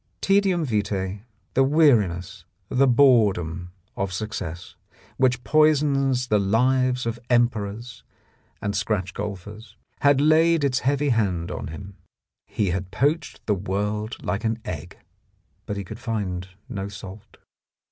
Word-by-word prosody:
Tcedium 195 Hz, -4 st, +2 dB
vitce, 100 Hz, -4 st, -2 dB, 0.3 s
the 135 Hz, -, +4 dB
weariness, 110 Hz, -, +2 dB, 0.3 s
the 135 Hz, +2 st, +3 dB
boredom 105 Hz, -, +3 dB, 0.3 s
of 95 Hz, -1 st, -2 dB
suc 105 Hz, +5 st, -4 dB
cess, 85 Hz, -3 st, -6 dB, 0.4 s
which 125 Hz, -2 st, +2 dB
poisons 140 Hz, -3 st, +2 dB
the 105 Hz, -, +3 dB
lives 125 Hz, +5 st, +2 dB
of 115 Hz, 0 st, -3 dB
emperors 120 Hz, -1 st, 0 dB, 0.6 s
and 100 Hz, 0 st, -1 dB
scratch 100 Hz, -2 st, -1 dB
golfers, 105 Hz, +2 st, -7 dB, 0.2 s
had 140 Hz, -1 st, +4 dB
laid 160 Hz, +2 st, +4 dB
its 130 Hz, -2 st, +2 dB
heavy 140 Hz, +2 st, +1 dB
hand 95 Hz, -8 st, 0 dB
on -, -, -5 dB
him. 95 Hz, +5 st, -9 dB, 0.5 s
He 100 Hz, -4 st, -1 dB
had 95 Hz, +1 st, -3 dB
poached 145 Hz, -, -1 dB
the 105 Hz, -, +2 dB
world 105 Hz, +4 st, -2 dB
like 100 Hz, +3 st, -2 dB
an 110 Hz, 0 st, 0 dB
egg. -, -, -6 dB, 0.7 s
But 105 Hz, -, -3 dB
he 100 Hz, -, -3 dB
could 110 Hz, +4 st, -9 dB
find 100 Hz, -7 st, -3 dB, 0.2 s
no 100 Hz, -6 st, -4 dB
salt. 100 Hz, 0 st, -11 dB
110 Hz, 130 wpm, -24 LUFS, 100-130 Hz, 0.7 s, the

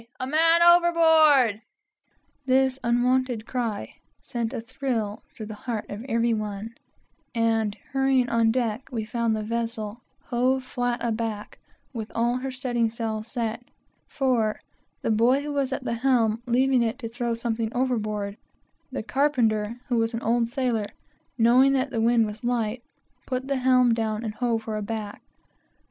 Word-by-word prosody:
a 255 Hz, -, -2 dB
man 330 Hz, +4 st, +4 dB
overboard!" 320 Hz, -9 st, +5 dB, 0.9 s
This 265 Hz, 0 st, +3 dB
unwonted 245 Hz, -1 st, +1 dB
cry 235 Hz, -5 st, -3 dB, 0.3 s
sent 235 Hz, -3 st, -3 dB
a -, -, -4 dB
thrill 230 Hz, -3 st, -3 dB
through 220 Hz, -, -8 dB
the 215 Hz, -, -7 dB
heart 220 Hz, 0 st, -5 dB
of 205 Hz, +3 st, -6 dB
every 230 Hz, -2 st, +1 dB
one, 215 Hz, +1 st, -4 dB, 0.6 s
and 225 Hz, -2 st, +1 dB, 0.2 s
hurrying 270 Hz, -2 st, +2 dB
on 230 Hz, -1 st, +2 dB
deck 235 Hz, 0 st, -1 dB
we 225 Hz, -3 st, -3 dB
found 230 Hz, 0 st, 0 dB
the 215 Hz, -, -3 dB
vessel 230 Hz, 0 st, -3 dB, 0.2 s
hove 255 Hz, +2 st, +1 dB
flat 245 Hz, -2 st, -2 dB
aback, 220 Hz, -2 st, -3 dB, 0.3 s
with 225 Hz, -3 st, -5 dB
all 235 Hz, +2 st, +1 dB
her 265 Hz, +1 st, -4 dB
studding 250 Hz, -3 st, -1 dB
sails 220 Hz, -1 st, -4 dB
set; 230 Hz, -1 st, -3 dB, 0.4 s
for 240 Hz, -6 st, 0 dB, 0.4 s
the -, -, +1 dB
boy 240 Hz, +6 st, +3 dB
who 295 Hz, 0 st, -4 dB
was 275 Hz, -2 st, 0 dB
at 265 Hz, -, -3 dB
the 245 Hz, -, -2 dB
helm 230 Hz, -2 st, +2 dB
left 260 Hz, +3 st, +2 dB
it 230 Hz, +1 st, 0 dB
to 250 Hz, -5 st, -5 dB
throw 235 Hz, 0 st, -2 dB
something 230 Hz, -1 st, -2 dB
overboard, 215 Hz, -5 st, -1 dB, 0.5 s
and 270 Hz, -, -7 dB
the -, -, -3 dB
carpenter, 230 Hz, -3 st, +1 dB
who 245 Hz, -, 0 dB
was 225 Hz, +1 st, 0 dB
an 230 Hz, -, -3 dB
old 230 Hz, +1 st, +2 dB
sailor, 240 Hz, -5 st, -1 dB, 0.5 s
knowing 250 Hz, +4 st, +5 dB
that 265 Hz, 0 st, 0 dB
the 230 Hz, -3 st, -1 dB
wind 230 Hz, 0 st, +4 dB
was 210 Hz, +3 st, -7 dB
light, 240 Hz, -1 st, -1 dB, 0.5 s
put 255 Hz, 0 st, -2 dB
the 275 Hz, -1 st, 0 dB
helm 250 Hz, -2 st, +4 dB
down 220 Hz, -1 st, -1 dB
and 220 Hz, -2 st, -3 dB
hove 230 Hz, -1 st, -1 dB
her 220 Hz, -1 st, -3 dB
aback. 210 Hz, 0 st, -5 dB
235 Hz, 160 wpm, -25 LUFS, 220-255 Hz, 0.9 s, overboard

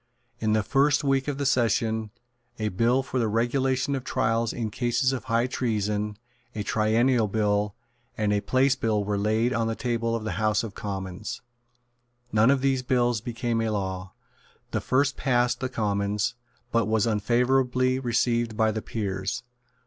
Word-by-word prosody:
In 110 Hz, -1 st, +1 dB
the 110 Hz, -1 st, +2 dB
first 140 Hz, +6 st, +2 dB
week 135 Hz, -1 st, +1 dB
of 145 Hz, -2 st, -2 dB
the 140 Hz, -, -2 dB
session, 115 Hz, -4 st, +1 dB, 0.5 s
a 110 Hz, -1 st, -1 dB
Bill 120 Hz, +7 st, +2 dB
for 130 Hz, 0 st, -2 dB
the 115 Hz, -, +1 dB
Regulation 130 Hz, +5 st, +1 dB
of 135 Hz, -2 st, -2 dB
Trials 115 Hz, -1 st, 0 dB
in 110 Hz, -3 st, -3 dB
cases 125 Hz, +3 st, +1 dB
of 130 Hz, -, -4 dB
High 115 Hz, +1 st, +2 dB
Treason, 105 Hz, -4 st, -1 dB, 0.4 s
a 105 Hz, -, -2 dB
Triennial 110 Hz, +3 st, +2 dB
Bill, 105 Hz, -1 st, 0 dB, 0.4 s
and 105 Hz, -1 st, +1 dB
a 100 Hz, -, +1 dB
Place 130 Hz, +3 st, +2 dB
Bill 110 Hz, -5 st, 0 dB
were 100 Hz, 0 st, -1 dB
laid 110 Hz, +4 st, +1 dB
on 115 Hz, -1 st, 0 dB
the 115 Hz, -, -1 dB
table 115 Hz, -1 st, -1 dB
of 115 Hz, -, -3 dB
the 110 Hz, -, -3 dB
House 105 Hz, 0 st, +2 dB
of 110 Hz, -3 st, -6 dB
Commons. 95 Hz, 0 st, -5 dB, 0.9 s
None 110 Hz, +3 st, +4 dB
of 135 Hz, -1 st, +3 dB
these 135 Hz, -1 st, +2 dB
bills 120 Hz, -3 st, +1 dB
became 115 Hz, 0 st, -2 dB
a 115 Hz, -, 0 dB
law. 95 Hz, -3 st, -3 dB, 0.6 s
The -, -, -1 dB
first 135 Hz, +1 st, +1 dB
passed 125 Hz, -2 st, +1 dB
the 130 Hz, -, -2 dB
Commons, 105 Hz, 0 st, -1 dB, 0.4 s
but 115 Hz, -3 st, +2 dB
was 110 Hz, -1 st, +2 dB
unfavourably 125 Hz, +3 st, +2 dB
received 120 Hz, -2 st, 0 dB
by 110 Hz, -1 st, +3 dB
the 110 Hz, 0 st, -3 dB
Peers. 100 Hz, +2 st, -3 dB
115 Hz, 165 wpm, -26 LUFS, 105-125 Hz, 0.9 s, None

